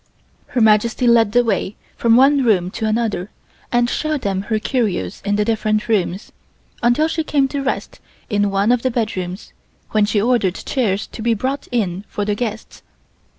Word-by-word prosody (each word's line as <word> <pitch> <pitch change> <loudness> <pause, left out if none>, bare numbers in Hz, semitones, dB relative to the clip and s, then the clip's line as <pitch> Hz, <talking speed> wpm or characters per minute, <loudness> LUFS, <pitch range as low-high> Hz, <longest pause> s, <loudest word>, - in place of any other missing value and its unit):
Her 245 - -1
Majesty 220 +3 +3
led 230 -3 +4
the 245 +2 +4
way 220 -3 -1 0.2
from 230 -1 +3
one 275 +2 +5
room 185 -6 +2
to 220 +1 -3
another 215 -4 -1 0.4
and 240 0 +2
showed 305 +2 -2
them 195 -3 -1
her 220 - +2
curios 215 - -2
in 205 0 0
the 210 0 +1
different 215 0 0
rooms, 195 -3 -1 0.5
until 240 +7 +3
she 320 0 -2
came 285 -3 +1
to 285 0 -3
rest 275 0 -3 0.3
in 205 -2 +1
one 200 +3 +2
of 245 -1 +2
the 260 - +1
bedrooms, 200 -6 -4 0.4
when 215 -1 +3
she 205 0 0
ordered 205 -5 +1
chairs 205 -6 -1
to - - -10
be 230 0 +1
brought 265 +6 -3
in 195 -6 -1
for 205 - -3
the 210 - 0
guests. 220 0 -5
220 Hz, 180 wpm, -19 LUFS, 205-245 Hz, 0.5 s, one